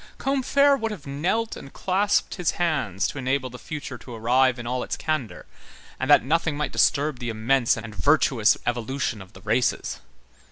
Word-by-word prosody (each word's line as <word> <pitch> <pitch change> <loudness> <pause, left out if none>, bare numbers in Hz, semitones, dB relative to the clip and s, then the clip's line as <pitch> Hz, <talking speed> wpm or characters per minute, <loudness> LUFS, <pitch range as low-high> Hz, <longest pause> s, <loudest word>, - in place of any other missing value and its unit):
Combeferre 280 +1 +3
would 225 -1 -1
have 190 -9 -8
knelt 180 +11 -1
and 135 - -11
clasped 200 +2 +1
his 180 -3 -1
hands 140 - 0
to 145 - -6
enable 130 0 -1
the 125 - -10
future 140 -5 -7
to 120 0 -10
arrive 125 +3 +2
in 120 - -7
all 125 +1 -2
its - - -4
candor, 155 -8 -3 0.5
and - - -2
that - - +6
nothing 160 +1 +1
might 150 -2 -2
disturb 145 -3 +2
the 120 - -4
immense 115 +3 +2
and 115 -1 -7
virtuous 135 -4 +3
evolution 120 -1 -2
of 95 +2 -14
the - - -14
races. 120 +3 0
135 Hz, 175 wpm, -24 LUFS, 120-160 Hz, 0.5 s, that